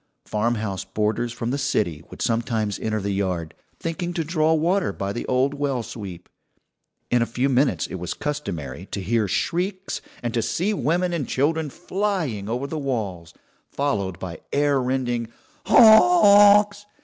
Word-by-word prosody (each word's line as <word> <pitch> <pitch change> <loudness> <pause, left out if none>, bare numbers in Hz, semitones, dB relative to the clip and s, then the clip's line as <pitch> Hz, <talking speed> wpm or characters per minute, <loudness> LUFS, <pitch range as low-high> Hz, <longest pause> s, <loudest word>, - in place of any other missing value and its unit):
Farmhouse 110 -3 -1
boarders 110 +3 -1
from 120 0 -3
the 140 - -1
city 95 - -1
would - - -6
sometimes 115 -3 -1
enter 110 -1 -1
the 100 0 -2
yard, 90 -5 -2 0.3
thinking 175 +1 -3
to 165 - 0
draw 155 0 +1
water 175 +5 +1
by 100 0 -4
the 120 - -5
old 130 +2 +1
well 140 -4 -1
sweep; 100 -7 -8 0.8
in 120 - +3
a 115 - +1
few 125 +3 0
minutes 135 +1 +2
it - - -9
was 90 - -4
customary 100 - -5
to - - -4
hear 105 +3 0
shrieks, 185 - -2 0.2
and 120 -1 -2
to 115 - +1
see 185 - -1
women 175 - 0
and 155 -6 -2
children 155 +3 0
flying 175 - -2
over 125 +4 -2
the 155 +2 -4
walls, 100 - -4 0.3
followed 100 - -2
by 85 -3 -7
air 145 -1 +2
rending 120 -3 -1 0.4
"Honks!" 205 - +7
130 Hz, 155 wpm, -23 LUFS, 105-165 Hz, 0.8 s, Honks